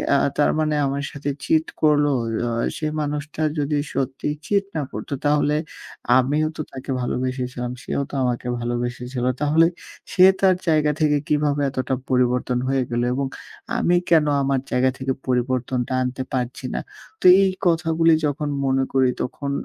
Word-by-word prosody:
আ - - +5 0.2
তার 145 - +3
মানে 155 -1 +1
আমার 140 +1 -2
সাথে 145 0 -4
চিট 160 0 +2 0.2
করলো? 150 -1 +4 0.4
অ - - -2 0.3
সেই 155 -1 -2
মানুষটা 150 +1 -4 0.2
যদি 145 +1 0 0.2
সত্যি 135 0 -2 0.2
চিট 200 -1 +2
না 155 - 0
করত - - -7 0.2
তাহলে 150 0 +2 0.6
আমিও 145 +4 +2
তো - - -2
তাকে 130 +1 -9
ভালোবেসেছিলাম, 125 0 -3
সেও - - -2
তো - - -17
আমাকে 125 0 -1
ভালোবেসেছিল। 120 +1 -3 0.2
তাহলে 155 +3 +4 0.5
সে 185 - +7 0.2
তার 190 -1 +5
জায়গা 155 -2 +3
থেকে 150 -1 +3
কিভাবে 145 -1 +1
এতটা 130 0 -2
পরিবর্তন 125 0 +1
হয়ে 135 -1 +1
গেলো? 120 0 0
এবং 135 +1 -1 0.5
আমি 175 - +2 0.2
কেন 160 -3 +6 0.2
আমার 135 -1 +1
জায়গা 125 +1 +3
থেকে 130 0 -1
পরিবর্তনটা 125 0 -1
আনতে 130 +1 -3
পারছি 125 -1 -3
না? - - -1 0.4
তো - - -5 0.2
এই 190 - +3 0.2
কথাগুলি 165 -1 +3
যখন 150 0 -1 0.2
মনে 135 0 +2
করি 130 -1 +4
তখন 140 +2 -4
135 Hz, 155 wpm, -22 LUFS, 125-150 Hz, 0.6 s, সে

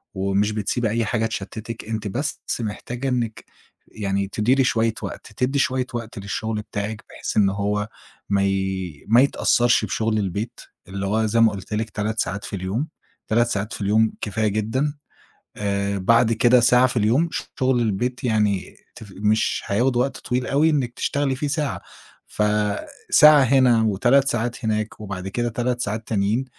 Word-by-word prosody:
ومش 100 +2 +1
بتسيبي 110 +2 -1
أي 115 +1 0
حاجة 110 0 0
تشتِّتِك، 110 +1 -6
أنتِ 110 -1 -3
بس 140 +9 -3 0.2
محتاجة 120 +4 -4
إنِّك 120 -3 -2 0.5
يعني 100 -2 -2
تديري 120 +7 +2
شوية 115 -2 +1
وقت، - - -7
تدّي 135 +2 +1
شوية 130 -1 +1
وقت 115 -1 -5
للشُغل 105 +3 -3
بتاعِك 105 -1 -5
بحيث - - -5
إن 100 -2 +5
هو 105 +1 -1 0.4
ما 100 -1 +2
ي 95 -5 -2
ما 120 +4 +6
يتأثّرش 120 -4 +3
بشُغل 110 +2 -1
البيت 100 +3 -3 0.3
اللي 95 +1 -4
هو 110 +3 +1
زي 115 +2 +1
ما 115 - +6
قُلت 100 +1 -7
لِك 110 +1 -1
3 110 +2 -3
ساعات 100 +2 -2
في - - -5
اليوم، 100 - -2 0.4
3 120 +2 +3
ساعات 105 -1 -3
في - - -7
اليوم 110 +2 +2
كفاية 110 +1 -1
جدًا. 110 +8 -1 0.6
آآ 100 -1 -1
بعد 115 +4 +3
كده 120 +2 +5
ساعة 125 +2 +5
في 125 - -3
اليوم 125 +11 +2 0.3
شُغل 130 -1 +2
البيت 120 +5 -1
يعني 105 -5 0 0.2
تف 105 -3 -12
مش 105 +2 +1
هياخُد 120 +5 +1
وقت 130 +2 0
طويل 125 0 -2
أوي 150 +4 +3
إنِّك 130 -6 0
تشتغلي 140 -2 -1
فيه 145 +2 -2
ساعة. 140 - -2 0.5
فساعة 105 +8 +3
هنا 125 -3 +4
و3 120 +6 +3
ساعات 120 0 -2
هناك 110 0 -2
وبعد 95 -3 -6
كده 120 +4 -1
3 120 +2 -1
ساعات 110 +1 -3
تانيين 110 +5 0
110 Hz, 165 wpm, -22 LUFS, 100-125 Hz, 0.6 s, ما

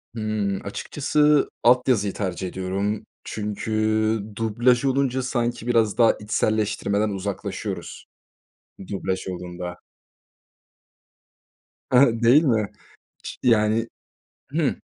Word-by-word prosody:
Hımm. 110 -3 -2
Açıkçası, 150 +7 +1
alt 125 +1 +5
yazıyı 105 -6 +2
tercih 95 -2 -3
ediyorum 95 +3 -3 0.2
çünkü 105 +1 -4 0.6
dublaj 120 +4 +2
olunca 130 -1 +1
sanki 120 -2 -2
biraz 115 -3 +2
daha 115 -2 +6
içselleştirmeden 105 0 0
uzaklaşıyoruz, 100 0 -5 0.8
dublaj 95 -1 -3
olduğunda. 90 0 -6 2.1
Hı 125 - +5
hı. 120 -4 +4
Değil 135 +8 +6
mi? 110 -7 +1 0.5
Çi - - -7
yani. 115 -1 +3 0.6
Hıı. - - +1
110 Hz, 95 wpm, -23 LUFS, 100-120 Hz, 2.1 s, daha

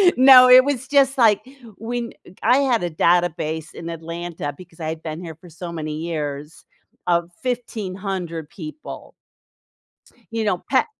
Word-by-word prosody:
No, 255 -1 +9
it 255 0 +9
was, 260 -2 -2
just, 275 0 +3
like, 220 -5 +4 0.4
when 235 +1 -4 0.3
I 250 - +5
had 255 -5 +2
a 175 - -1
database 160 -1 0
in 170 0 -7
Atlanta 165 -2 -5
because 175 -2 -15
I've 160 0 -5
been 155 0 -5
here 165 -3 -8
for 175 +3 -16
so 170 +1 -8
many 155 -2 -4
years 150 -2 -5 0.4
of 170 -1 +1
1,500 190 - -4
people. 310 0 -9 1.2
You 225 -1 -2
know, 195 -4 -1
pa 265 - +3
175 Hz, 140 wpm, -21 LUFS, 160-240 Hz, 1.2 s, No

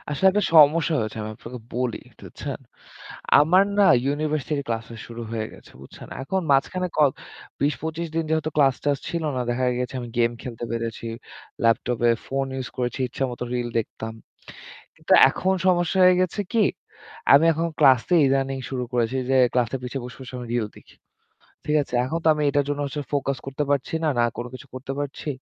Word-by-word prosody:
আসলে 150 +7 +1
একটা 210 +2 +1
সমস্যা 160 +2 +6
হয়েছে। 110 0 -4
আমি 110 - -5
আপনাকে 125 +2 -9 0.2
বলি 125 -2 -1
একটু - - -24
বুঝছেন? - - -6 0.8
আমার 180 +6 +5 0.2
না - - +7 0.2
ইউনিভার্সিটির 150 0 -1
ক্লাসটা 115 0 -4
শুরু 120 0 -8
হয়ে 110 -1 -2
গেছে। - - -16
বুঝছেন। 70 - -12
এখন 190 +8 -1
মাঝখানে 180 +7 +1
ক - - +1 0.6
২০-২৫ 160 +3 -1
দিন 165 - +1
যেহেতু 160 -1 0
ক্লাস-টাস 140 0 +2
ছিল 170 -2 -2
না। 125 - 0
দেখা 125 +2 0
গেছে 125 0 -3
আমি 120 -1 -7
গেম 115 0 +3
খেলতে 120 -2 -6
পেরেছি। 115 0 -4 0.6
ল্যাপটপে 120 +1 +2 0.2
ফোন 135 0 -1
ইউস 130 -1 -4
করেছি। 125 +1 -2
ইচ্ছামতো 125 -1 -3
রিল 120 -1 -1
দেখতাম। 110 0 -6 0.8
কিন্তু - - 0 0.2
এখন 190 +1 0
সমস্যা 175 0 +2
হয়ে 180 0 +7
গেছে 185 +3 -1
কি? 225 -3 +4 0.7
আমি 145 +4 +7
এখন 165 +2 -1
ক্লাসে 130 +6 +5
ইদানিং 135 0 +1
শুরু 130 -2 -3
করেছি 120 +1 0
যে 135 - +3 0.2
ক্লাসের 125 +1 0
পিছে 125 +2 -4
বসে, 125 - -9
বসে 130 -1 -10
আমি 120 - -7
রিল 120 -3 0
দেখি। - - -18 0.7
ঠিক 150 0 +2
আছে? 130 - -9
এখন 155 +6 -2
তো - - +4
আমি 150 - -2
এটার 145 0 +1
জন্য 145 0 -2
হচ্ছে 145 +2 -4
ফোকাস 140 -1 0
করতে 135 +2 -3
পারছি 140 +3 0
না। - - +2
না 120 - +4
কোনো 120 +1 -5
কিছু 130 - -10
করতে 130 +1 -5
পারছি। 145 +1 -5
135 Hz, 180 wpm, -24 LUFS, 120-155 Hz, 0.8 s, না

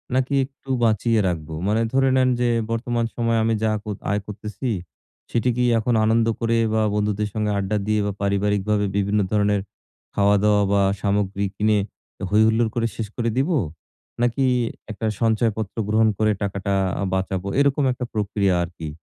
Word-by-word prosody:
নাকি 130 +2 +1
একটু 135 0 -19
বাঁচিয়ে 110 0 +2
রাখবো? 80 -3 -3
মানে 110 +2 +2
ধরে 135 0 +3
নেন 130 -1 +4
যে 120 -1 +2 0.2
বর্তমান 115 0 -1
সময়ে 115 -1 +1
আমি 115 0 +2
যা 110 - +2
ক - - -59 0.3
আয় 105 0 0
করতেছি, 105 +3 -5 0.6
সেটি 120 +2 +1
কী 125 - +2 0.2
এখন 120 +2 0
আনন্দ 115 +1 +3
করে 115 0 +1 0.2
বা 110 - +2
বন্ধুদের 105 0 0
সাথে 105 -1 -1
আড্ডা 100 +2 -1
দিয়ে 105 0 +2
বা 105 - -1
পারিবারিকভাবে 105 +1 +1
বিভিন্ন 100 +1 +1
ধরনের 105 -1 +2 0.5
খাওয়া-দাওয়া 105 +1 +3
বা 100 -1 +3 0.2
সামগ্রী 100 -1 0
কিনে 105 0 +2 0.5
হৈহুল্লোড় 110 +2 +4
করে 115 -1 +1
শেষ 110 -2 -3
করে 115 -1 0
দিবো? 155 +4 +2 0.6
নাকি 120 +3 +1 0.5
একটা 110 +1 -5 0.2
সঞ্চয়পত্র 110 -2 0
গ্রহণ 110 +1 +3
করে 110 0 +2
টাকাটা 100 0 -2 0.3
আ - - 0
বাঁচাবো? 95 0 -2
এরকম 140 0 +3
একটা 125 0 -4
প্রক্রিয়া 100 -3 +1
আরকি। 80 -2 -7
110 Hz, 160 wpm, -22 LUFS, 100-115 Hz, 0.6 s, নেন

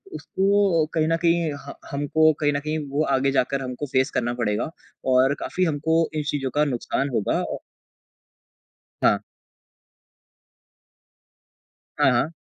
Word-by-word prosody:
उसको 195 -4 +2
कहीं 155 -1 +1
न 165 - +2
कहीं 170 -2 +2
ह 140 - -7 0.2
हमको 155 +3 +3
कहीं 145 -1 +2
न 140 - 0
कहीं 155 +2 -3
वो 145 +3 0
आगे 135 +1 +1
जाकर 135 +1 0
हमको 130 +2 -4
फ़ेस 130 +1 +1
करना 120 0 -1
पड़ेगा 115 +2 -1 0.4
और 130 +2 +4
काफ़ी 185 - -2
हमको 160 +1 +1
इन 150 - -1
चीज़ों 140 -3 -1
का 150 - +4
नुकसान 135 +1 -1
होगा 110 -5 0
औ - - -4 1.5
हाँ। - - +4 2.8
हाँ, 135 - +4
हाँ। 125 +5 +1
145 Hz, 135 wpm, -24 LUFS, 130-160 Hz, 2.8 s, और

